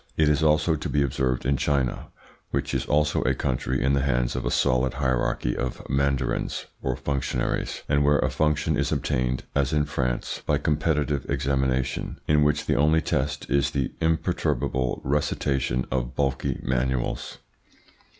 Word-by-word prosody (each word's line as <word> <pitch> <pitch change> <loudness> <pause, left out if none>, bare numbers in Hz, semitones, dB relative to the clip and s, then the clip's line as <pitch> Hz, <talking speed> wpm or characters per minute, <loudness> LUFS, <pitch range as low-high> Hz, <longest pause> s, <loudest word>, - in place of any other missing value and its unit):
It 80 -1 +4
is 75 +1 +2
also 75 +1 +3
to 75 - -4
be 75 - +2
observed 65 -2 -1
in 70 +1 +2
China, 70 -4 0 0.4
which - - -2
is - - -1
also 75 0 +2
a - - +1
country 65 -1 -1
in 70 +1 +2
the 70 - +2
hands - - 0
of - - -3
a - - +2
solid 65 +1 +2
hierarchy 65 -2 0
of 65 - -4
mandarins 70 -1 0 0.2
or 65 -2 -1
functionaries, 65 -3 -2
and 70 0 +2
where 75 +1 +4
a - - 0
function 75 -1 +1
is - - 0
obtained, 65 0 0
as 70 +2 +1
in 75 -1 +2
France, 60 -4 -2
by - - +1
competitive 75 -2 0
examination, 65 -2 -1
in 75 0 +4
which 75 0 +2
the - - +1
only 75 +3 +4
test 70 +1 -1
is 70 0 +2
the 70 -2 -1
imperturbable 80 -6 0
recitation 70 -3 0
of - - -2
bulky 70 -2 -1
manuals. 65 0 -1
70 Hz, 160 wpm, -25 LUFS, 65-75 Hz, 0.4 s, It